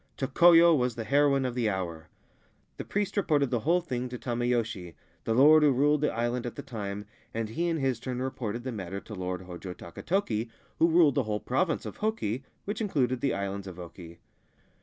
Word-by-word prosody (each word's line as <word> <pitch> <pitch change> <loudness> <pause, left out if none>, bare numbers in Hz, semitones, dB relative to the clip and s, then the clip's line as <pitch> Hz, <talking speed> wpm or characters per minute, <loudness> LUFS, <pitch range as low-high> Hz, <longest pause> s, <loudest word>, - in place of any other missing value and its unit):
Tokoyo 170 +5 +6
was 125 -4 0
the 115 - -4
heroine 140 +1 +3
of 125 - -2
the 120 -3 0
hour. 85 -5 -4 0.7
The - - -4
priest 205 -1 -2
reported 150 - +2
the 120 - +1
whole 170 +9 +2
thing 125 -6 -4
to 125 - -6
Tameyoshi, 115 - -2 0.3
the 115 - +1
lord 150 +5 +7
who 150 -1 +5
ruled 145 +3 +3
the 150 - +2
island 120 +1 -1
at 120 - -6
the - - -7
time, 105 -5 -5 0.3
and 115 -1 -2
he 170 +10 -1
in 165 -1 0
his 135 -5 0
turn 125 0 -4
reported 125 -3 -3
the 130 - -3
matter 100 -3 -5
to 105 - -11
the 100 - -7
Lord 90 0 -3
Hojo 90 0 -8
Takatoki, 115 - -2 0.3
who 165 - +5
ruled 165 -4 +5
the 140 - +1
whole 105 -1 -1
Province 160 +9 -1
of - - -7
Hoki, 140 - -2 0.2
which 205 +3 -3
included 130 - 0
the 135 - +1
Islands 100 0 -4
of 90 -2 -8
Oki. 85 -1 -10
125 Hz, 200 wpm, -28 LUFS, 105-145 Hz, 0.7 s, lord